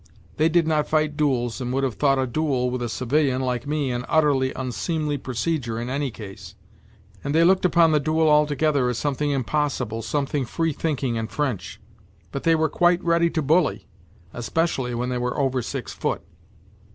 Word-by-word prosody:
They 160 +1 +3
did 170 0 +3
not 155 -2 +1
fight 155 -1 +1
duels 130 -5 0
and 125 -1 -3
would 135 +1 0
have 130 -3 0
thought 135 +1 +2
a 130 - +1
duel 130 -2 0
with 125 0 -3
a 120 - -2
civilian 130 +2 +1
like 125 0 -2
me 145 -3 -1
an 120 0 -2
utterly 145 -5 +3
unseemly 145 +3 -2
procedure 125 -2 -2
in 120 +2 -4
any 140 0 -1
case 105 -4 -10 0.7
and 140 +1 -2
they 165 - +5
looked 185 +2 +4
upon 170 -2 +4
the 150 - +3
duel 160 +2 +1
altogether 150 -3 +3
as 125 - -2
something 145 +1 -1
impossible, 135 -4 -1
some 140 +6 -1
thing 135 -1 -2
free 165 +5 -1
thinking 135 -6 -1
and 110 0 -4
French. 125 -12 -3 0.5
But 140 - -4
they 165 0 +5
were 160 0 +2
quite 175 +3 +2
ready 170 0 +3
to 160 -2 -1
bully, 155 +3 +2 0.5
especially 125 -1 -1
when 125 +1 -2
they 125 -1 -1
were 125 0 -2
over 135 -3 +1
six - - -5
foot. - - -2
140 Hz, 190 wpm, -24 LUFS, 125-155 Hz, 0.7 s, they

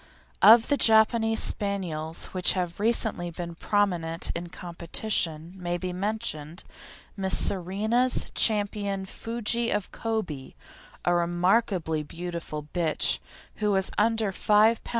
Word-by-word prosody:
Of 225 +3 +7
the 285 - +3
Japanese 225 0 +4
Spaniels 170 -6 -2
which 185 -1 +5
have 180 -1 -3
recently 215 -5 -1
been 170 0 -7
prominent 175 -3 -1
in 170 0 -5
competition, 170 -1 -2
may 175 -2 -3
be 180 0 -5
mentioned 185 -5 -3 0.5
Miss 190 -2 +2
Serena's 215 +7 +1
Champion 205 -2 0
Fuji 235 +3 -2
of 205 -2 -2
Kobe, 200 -12 -4 0.5
a 175 - +3
remarkably 175 -1 +1
beautiful 165 -1 -6
bitch, 170 -3 +1 0.4
who 210 -1 0
was 190 0 0
under 220 -1 +1
5 215 +3 +3
lb. - - -11
190 Hz, 115 wpm, -26 LUFS, 170-220 Hz, 0.5 s, Of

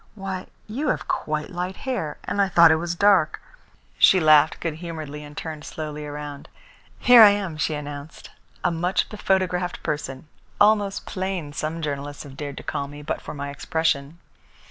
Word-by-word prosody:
Why, 190 -2 -5 0.2
you 265 +8 -3
have - - -1
quite 155 +3 -2
light 180 +1 -3
hair, 235 - -3
and 205 - 0
I 195 - +2
thought 170 -3 +7
it 160 - +4
was 170 +1 -3
dark!" 190 -4 +3 0.6
She 190 - +7
laughed 155 -1 +5
good 165 -2 -2
humouredly 155 -4 -6
and 145 0 -12
turned 155 -2 -6
slowly 150 -1 -6
around. 145 -1 -7 0.5
"Here 245 -2 +8
I 215 - +11
am," 200 -5 -1
she 155 0 -1
announced, 145 +1 -8 0.3
"a 180 - +2
much 175 +3 0
bephotographed 185 -3 -1
person. 150 -2 -4 0.3
Almost 205 -1 +3
plain, 185 -6 -4
some 160 +2 -3
journalists 145 -1 -4
have 135 -2 -11
dared 145 0 -6
to - - -7
call 140 - -3
me, 145 +1 -10
but - - -3
for - - -8
my 140 0 -5
expression. 160 -1 -1
160 Hz, 170 wpm, -24 LUFS, 150-190 Hz, 0.6 s, I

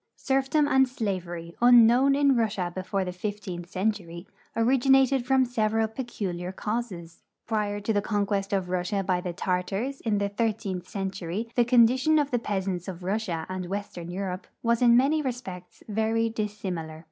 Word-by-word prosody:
Serfdom 270 +2 +1
and 265 -2 +4
slavery, 180 -8 -4
unknown 245 +3 +6
in 280 -1 +4
Russia 210 -6 0
before 190 +1 -2
the 180 - -3
fifteenth 180 -2 -5
century, 185 -3 -2 0.3
originated 265 +2 +3
from 265 -1 +4
several 225 -2 +1
i)eculiar 195 -6 -5
causes. 200 -8 -4 0.2
Prior 210 -2 -1
to 205 +2 -1
the 205 - +2
conquest 200 -1 -1
of 190 -3 -1
Russia 185 +2 -1
by 180 -1 0
the 180 - -3
Tartars, 195 +9 -2
in 215 -3 0
the 200 0 0
thirteenth 200 -4 -2
century, 195 +2 -4
the 240 - +4
condition 255 +5 +4
of 290 -2 +1
the 245 - +1
peasants 190 -4 -3
of 185 -2 -7
Russia 185 -4 -2
and 185 -1 -4
western 195 -4 -5
Europe 185 0 -4 0.2
was 235 0 +2
in 240 -1 +6
many 290 +5 +3
respects 195 -10 -6
very 225 +1 0
dissimilar. 190 -8 -4
205 Hz, 155 wpm, -27 LUFS, 185-240 Hz, 0.3 s, unknown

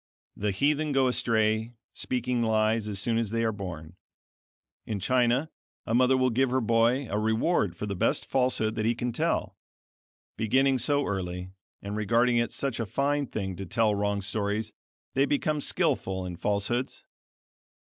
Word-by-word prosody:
The 105 - -1
heathen 145 +8 +1
go 135 -1 +3
astray, 110 -1 +1 0.2
speaking 125 -1 -1
lies 110 -1 +1
as 105 -2 -3
soon 115 +3 0
as 115 -3 -1
they 115 +1 -1
are 110 - +1
born. 90 -4 -7 0.9
In 105 -2 -2
China 125 - +1 0.3
a 115 - -2
mother 130 +2 +4
will 130 -1 +2
give 130 +3 +2
her 130 +1 +1
boy 115 +3 +2
a 105 0 -1
reward 110 - +1
for 105 - -4
the 100 -1 -3
best - - +1
falsehood 125 -4 +1
that 110 -1 -2
he 120 - +2
can 120 +1 -2
tell. 120 - -1 0.8
Beginning 130 +5 +2
so 145 +4 +2
early, 90 -2 -4 0.3
and 100 +1 -4
regarding 115 +3 +2
it 120 0 +1
such 135 -4 -2
a 115 - -2
fine 140 +6 0
thing 95 -5 -4
to 95 - -5
tell 110 +2 +2
wrong 100 -1 -1
stories, 105 +2 -2 0.4
they 135 +1 +2
become 150 +1 0
skillful 130 - +1
in 90 -1 -5
falsehoods. 105 +7 -2
115 Hz, 165 wpm, -27 LUFS, 105-130 Hz, 0.9 s, mother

